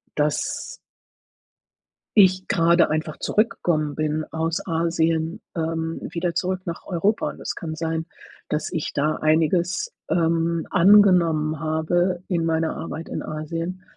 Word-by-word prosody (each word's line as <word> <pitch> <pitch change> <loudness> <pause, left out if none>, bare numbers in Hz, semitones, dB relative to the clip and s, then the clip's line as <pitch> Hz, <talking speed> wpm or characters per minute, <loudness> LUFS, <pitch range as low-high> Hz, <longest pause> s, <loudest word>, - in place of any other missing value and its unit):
dass 150 0 -1 1.4
ich 190 -2 +5
grade 170 0 +3
einfach 155 0 -2
zurückgekommen 165 -9 0
bin 155 0 -1
aus 160 +1 -1
Asien, 165 0 0 0.2
ähm, 165 0 -2
wieder 170 0 -2
zurück 185 0 -1
nach 170 -1 -5
Europa. 195 +4 0
Und - - -12
es - - -3
kann 160 -4 -5
sein, 160 0 -2 0.5
dass 150 0 -1
ich 165 -4 -3
da 150 +2 0
einiges, 170 - +1 0.2
ähm, 165 -1 +1
angenommen 170 -5 +5
habe 175 +3 0
in 170 -3 0
meiner 160 0 0
Arbeit 165 0 -6
in - - -4
Asien, 165 +4 -5
165 Hz, 125 wpm, -23 LUFS, 160-175 Hz, 1.4 s, ich